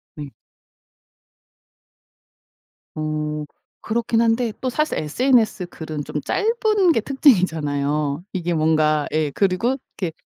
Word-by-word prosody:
네. 145 -2 -8 2.6
어. 150 0 -3 0.4
그렇긴 230 0 +1
한데 230 0 +1
또 260 - -1
사실 305 +5 -1
SNS 220 - +1
글은 155 -4 -7
좀 150 - -4
짧은 425 -5 +2
게 - - +1
특징이잖아요. 155 - +1
이게 175 -2 -2
뭔가 155 -2 +2
예 155 -1 0
그리고 195 - +1 0.2
이렇게 175 -4 -3
175 Hz, 210 characters per minute, -21 LUFS, 150-235 Hz, 2.6 s, 짧은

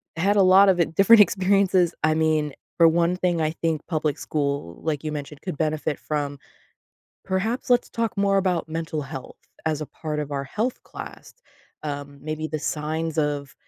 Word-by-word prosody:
had 200 +5 +2
a - - +6
lot 190 +1 +7
of, 180 - +3
uh, 170 - +5
different 210 +2 +7
experiences. 190 -3 +3
I 155 0 +4
mean, 155 -2 +1 0.2
for 165 -1 +7
one 170 +2 +2
thing, 175 -3 0
I 155 0 +1
think 165 -2 -2
public 155 -3 -1
school, 140 - -3
like 150 -3 -1
you 155 - -3
mentioned, 150 -1 -6
could 180 -6 -5
benefit 155 -1 -1
from: 145 -2 -3 0.9
"Perhaps 205 +6 -2
let's 245 0 +3
talk 230 -2 -2
more 200 0 +3
about 180 -4 0
mental 160 -1 -3
health 135 -2 -8 0.3
as 155 -2 0
a - - -5
part 150 0 -5
of 150 -1 -3
our 140 -1 -2
health 220 - -3
class." - - -10 0.5
Um, 145 -1 -6
maybe 155 +1 -3
the 155 - -3
signs 155 +2 -3
of 145 -2 -1
160 Hz, 180 wpm, -24 LUFS, 150-185 Hz, 0.9 s, lot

